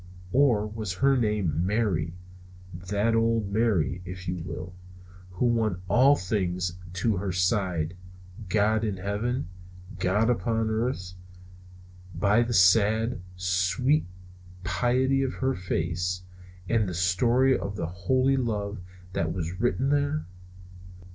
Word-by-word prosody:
Or 125 -6 +3
was 105 -3 -4
her 135 +9 +3
name 105 - 0
Mary? 90 -5 0 0.6
"That 100 +5 -1
other 115 0 +2
Mary," 100 -4 0
if 90 +1 -8
you 90 +1 -2
will, 90 +1 -7 0.6
who 90 +6 -2
won 110 -6 +1
all 130 +9 +5
things 90 -4 -2
to 95 +3 0
her 95 0 -2
side, 90 -3 0 0.5
God 110 +2 +2
in 105 -4 -1
heaven, 105 +5 -2 0.5
God 105 +5 +2
upon 110 +1 0
earth, 110 -5 -2 1.0
by 100 +6 +3
the 120 0 -1
sad, 110 +2 +4
sweet 95 - +1 0.6
pity 125 +9 +1
of 135 -1 -1
her 130 0 0
face, 90 0 -2 0.4
and 110 -3 +1
the 90 - -5
story 120 +9 +3
of 100 +1 -4
holy 130 - +1
love 105 -4 -2 0.3
that 80 -3 -1
was 90 +2 -4
written 125 +2 +1
there? 145 +1 +1
105 Hz, 120 wpm, -27 LUFS, 90-120 Hz, 1.0 s, all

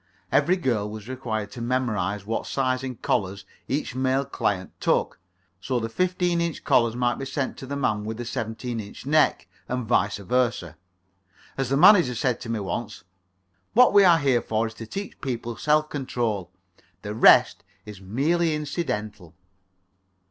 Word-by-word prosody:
Every 185 +2 +3
girl 115 - -1
was 110 0 -9
required 110 -5 -4
to 120 - -8
memorize 105 -6 -1
what 115 +2 -3
size 130 -1 0
in 130 -1 -5
collars 95 -2 -2 0.2
each 140 0 -2
male 130 +1 0
client 100 -8 -2
took, - - 0 0.4
so 125 +6 -1
that 115 - -3
the - - -21
fifteen 180 0 +1
inch 170 -2 -3
collars 115 -2 +3
might 120 0 0
be 135 - -4
sent 135 0 -3
to 135 - -9
the 140 - -4
man 110 -7 0
with 110 +1 -5
the 120 - -5
seventeen 115 +1 -4
inch 105 +3 -9
neck 155 +2 +2 0.2
and 125 -1 -2
vice 105 -3 +1
versa. 100 - -1 0.8
As 135 -2 -2
the 135 - +2
manager 175 - +6
said 120 +1 -1
to 115 - -7
me 115 -1 -1
once: 105 +1 -5 0.7
"What 250 -1 +6
we 200 -1 +7
are 175 -3 +6
here 135 -5 +2
for 110 +1 -1
is 110 - -5
to 115 - -7
teach 200 - -7
people 120 -3 -4
self 150 +3 +2
control. 115 - -2 0.5
The 105 - -4
rest 110 - +5 0.2
is 105 -3 -10
merely 155 - +1
incidental." 105 - -4
120 Hz, 170 wpm, -25 LUFS, 110-140 Hz, 0.8 s, we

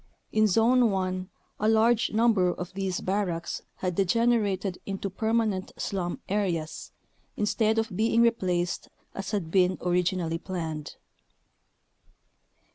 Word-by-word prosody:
In 215 0 +4
Zone 230 +4 +4
1 185 -1 -2 0.3
a 215 - +2
large 225 +1 +3
number 215 -5 +3
of 180 +1 -6
these 190 -1 -2
barracks 185 -4 -2
had 185 -1 -2
degenerated 200 -1 +1
into 195 0 -3
permanent 220 -2 0
slum 180 -3 -3
areas 180 -6 -2 0.5
instead 215 +1 +1
of 225 -3 -1
being 225 +3 +3
replaced 180 -6 0 0.2
as 195 0 -5
had 195 -7 -2
been 185 -1 +3
originally 175 -2 0
planned. 160 -5 -5
195 Hz, 115 wpm, -27 LUFS, 180-220 Hz, 0.5 s, In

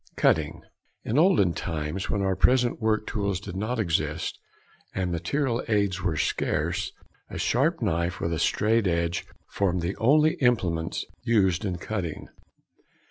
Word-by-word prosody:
CUTTING. - - +2 0.4
In 120 +7 +1
olden 160 - +4
times, 80 +3 -3
when 100 -1 0
our 95 -1 +1
present 125 +4 +3
work 110 -1 +1
tools 100 -3 -1
did 100 -2 -8
not 110 +6 -2
exist 85 -8 -1 0.6
and 90 -2 -1
material 115 - -1
aids 100 -4 +1
were 90 -5 -1
scarce, - - -1 0.4
a - - -6
sharp 145 +4 +1
knife 85 -2 0
and 85 -2 -1
straight 110 -1 +2
edge 85 0 -1 0.2
formed 90 -3 0
the 90 +4 -2
only 155 +8 +4
implements 90 - 0 0.2
used 95 -7 +2
in 90 -3 -2
cutting. 90 -3 -4
100 Hz, 135 wpm, -26 LUFS, 85-115 Hz, 0.6 s, olden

